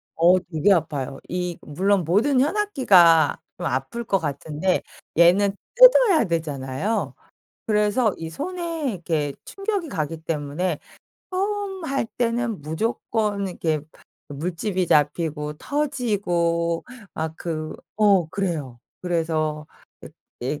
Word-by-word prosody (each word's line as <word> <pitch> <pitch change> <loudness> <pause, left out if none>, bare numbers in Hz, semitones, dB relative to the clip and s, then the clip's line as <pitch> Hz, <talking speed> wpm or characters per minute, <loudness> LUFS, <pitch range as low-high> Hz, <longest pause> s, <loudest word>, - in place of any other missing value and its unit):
어 175 +3 +5
되게 180 +3 +2
아파요. 145 -6 -2
이 180 -1 -3
물론 190 +5 +1
모든 230 - +3
현악기가 255 - +4 0.2
좀 - - -5
아플 135 - -2
것 195 -3 +1
같은데 155 +4 -1 0.4
얘는 195 +4 +5 0.2
뜯어야 - - +7
되잖아요. 155 - -2 0.5
그래서 210 +1 +2
이 165 0 -6
손에 330 - -3
이렇게 160 -6 -2
충격이 395 -4 -3
가기 160 -2 -2
때문에 155 +2 -2 0.5
처음 390 -1 -2
할 275 -6 -1
때는 235 -5 -1
무조건 205 +4 -1
이렇게 160 -4 -1 0.5
물집이 180 +5 -2
잡히고 150 0 +1
터지고 180 - -1 0.3
막 160 0 -3
그 155 -3 -4 0.2
어 200 -6 +4
그래요. 160 -10 -3 0.2
그래서 160 -3 -1 0.7
이 140 +5 -3
180 Hz, 225 characters per minute, -23 LUFS, 155-230 Hz, 0.7 s, 뜯어야